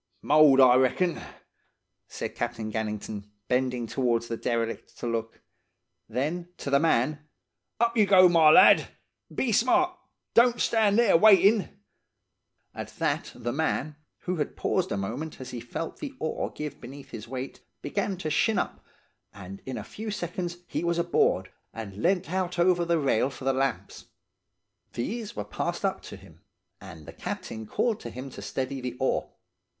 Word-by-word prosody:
"'Mould, 145 -2 +6
I 125 -1 +7
reckon,' 165 +7 +1 0.9
said - - -5
Captain 120 -2 -4
Gannington, 105 -1 -4 0.2
bending 125 -1 0
towards 115 -1 0
the 115 - -2
derelict 115 0 -3
to - - -6
look. 115 -1 -4 0.7
Then 155 +9 -2
to 140 - -5
the 140 - +5
man: 150 0 +1 0.5
"'Up 235 +1 +2
you 215 -3 +4
go, 185 -2 +7
my 165 -3 +6
lad, - - +7 0.4
and - - -16
be 255 - +1
smart! 255 - +3 0.4
Don't 240 0 +5
stand 215 -2 +3
there 235 -6 +5
waitin'!' 200 0 +5 0.9
"At - - -6
that - - -1
the 120 - -3
man, 155 0 -1 0.3
who 180 0 -3
had 150 - -3
paused 185 -1 0
a - - -1
moment 120 +11 -5
as 130 - -8
he 120 - -5
felt 120 +7 -6
the 285 -3 -7
oar 160 - -2
give 150 -1 -7
beneath 135 +3 -11
his 110 -1 -8
weight 130 +2 -6 0.2
began 200 -1 -2
to 155 -4 -4
shin' 215 +8 +2
up, - - -3 0.5
and 95 -1 -10
in 130 - -4
a - - -5
few 220 +1 -7
seconds 175 -3 -4
he - - -3
was 170 0 0
aboard, 170 0 +1 0.2
and 105 -4 -7
leant 180 -1 +1
out 185 -1 -1
over 175 0 +3
the 170 0 +2
rail 135 -4 +1
for 135 - -10
the 135 - +2
lamps. 135 -2 -2 0.9
These 215 - -4
were 105 - -4
passed 105 - -3
up - - -1
to - - -9
him, - - -18 0.4
and 80 -1 -11
the - - -10
captain 110 -1 -6
called 225 - 0
to - - -7
him 130 +2 -8
to - - -9
steady 135 0 -4
the 125 0 -5
oar. 130 - 0
150 Hz, 165 wpm, -27 LUFS, 120-185 Hz, 0.9 s, I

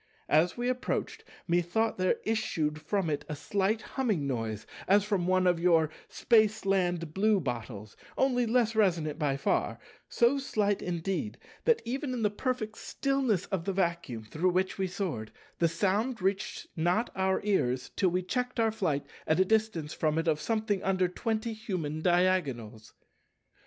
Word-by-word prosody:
As 170 +7 +3
we 240 +1 -1
approached, 255 0 -2 0.2
methought 175 +6 +1
there 185 +4 +3
issued 160 -9 -1
from 190 +3 -1
it 145 -2 -1
a 150 - -3
slight 200 +7 0
humming 215 - -1
noise 115 -5 -3 0.2
as 200 +1 +5
from 200 -4 0
one 185 0 +3
of 175 -2 +3
your 165 -3 +3 0.2
Spaceland 195 -7 +2
bluebottles, 125 - -1 0.2
only 245 -3 +2
less 230 -1 +2
resonant 170 -8 +1
by 140 -3 +1
far, 135 - 0 0.3
so 240 +4 +3
slight 205 -6 0
indeed 180 +4 -2 0.3
that 470 -1 +3
even 260 +3 -2
in 240 -3 -2
the 210 - +2
perfect 220 -1 -3
stillness 270 - 0
of 185 -4 -1
the 195 - -1
Vacuum 170 - -1
through 155 +12 0
which 185 +2 0
we 190 - +1
soared, 170 - -4 0.3
the 170 - +4
sound 200 +9 0
reached 195 +2 -1
not 175 +8 +1
our 190 0 +1
ears 130 -12 0
till 190 - +3
we 180 +1 -1
checked 250 +6 -2
our 225 -1 +3
flight 155 -10 -1 0.2
at 160 +2 +2
a 190 - +5
distance 210 -8 0
from 155 0 0
it 165 +1 0
of 155 -1 +1
something 215 -3 0
under 185 -1 +2
twenty 220 +5 -2
human 180 -9 -4
diagonals. 145 -12 0
185 Hz, 155 wpm, -30 LUFS, 160-220 Hz, 0.3 s, as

